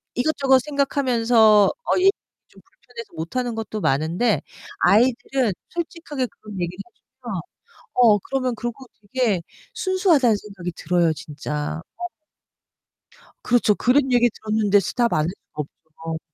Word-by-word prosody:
이것저것 270 0 +3
생각하면서 240 -7 +3
어 485 - -1
얘기 385 +1 +6 0.4
좀 - - -19
불편해서 245 - -13
못하는 235 +9 -3
것도 220 -1 -4
많은데 165 - +1 0.4
아이들은 245 +3 +3 0.2
솔직하게 325 -6 -4
그런 210 -2 -13
얘기를 175 +1 -3 0.4
하면서 - - -4 0.5
어 225 -4 +5
그러면 255 0 -2
그러고 240 +4 -6 0.3
되게 225 -9 +1 0.3
순수하다는 345 - +3
생각이 190 -4 -7
들어요, 175 -2 +1
진짜. 150 +1 -5 0.2
어. 355 0 -4 1.3
그렇죠. 235 -4 +3
그런 265 +1 +2
얘기 240 -1 +4
들었는데 215 -2 +1
스탑 235 +5 0
안 - - +2
할 - - -1
수가 180 -5 -8 0.5
없죠. 160 0 -3
235 Hz, 305 characters per minute, -22 LUFS, 200-265 Hz, 1.3 s, 얘기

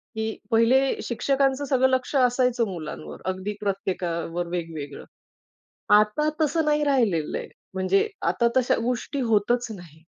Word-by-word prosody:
की 220 0 -3
पहिले 255 +4 +4
शिक्षकांचं 270 +3 0
सगळं 260 -1 +3
लक्ष 260 +2 -1
असायचं 250 -2 +3
मुलांवर, 115 - -7
अगदी 190 +2 -3
प्रत्येकावर 175 -4 -2
वेगवेगळं. 165 -5 -5 0.9
आता 210 +9 +3
तसं 315 +1 +2
नाही 300 0 +2
राहिलेलं 225 - +1
आहे, - - -7 0.3
म्हणजे 190 +1 +2 0.2
आता 235 +7 +2
तश्या 255 -1 +3
गोष्टी 250 +4 -2
होतच 240 +1 +1
नाहीत. 160 -2 -15
225 Hz, 125 wpm, -25 LUFS, 180-260 Hz, 0.9 s, पहिले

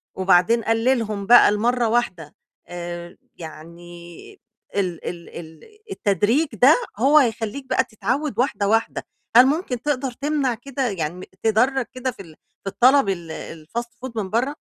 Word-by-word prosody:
وبعدين 190 +5 +3
قلِّلهم 225 -3 0
بقى 240 0 +7
لمرّة 235 +3 +1
واحدة 185 -10 -2 0.3
آآ 175 0 -7 0.2
يعني 170 +1 -12 0.4
ال 185 -4 -2
ال 170 -1 -9
ال 160 - -13 0.2
التدريج 230 - +1
ده 265 +5 +6 0.2
هو 280 +5 +5
هيخلّيك 235 0 0
بقى - - +2
تتعود 250 +8 -3
واحدة، 210 -6 0
واحدة. 225 +2 0 0.3
هل 245 +2 +9
ممكن 270 -4 -1
تقدر 275 -2 -2
تمنع 280 0 -1
كده 265 +2 -4
يعني 180 -1 -5
تدّرج 245 +4 +2
كده 255 0 -3
في 220 - -12
ال 160 -4 -14 0.3
في 195 - -3
الطلب 255 +2 +4
ال 175 -3 -4 0.4
الfast 235 +6 -4 0.2
food 260 - -6
من 205 -4 -3
برّه؟ 235 +6 +1
225 Hz, 145 wpm, -22 LUFS, 180-255 Hz, 0.4 s, هل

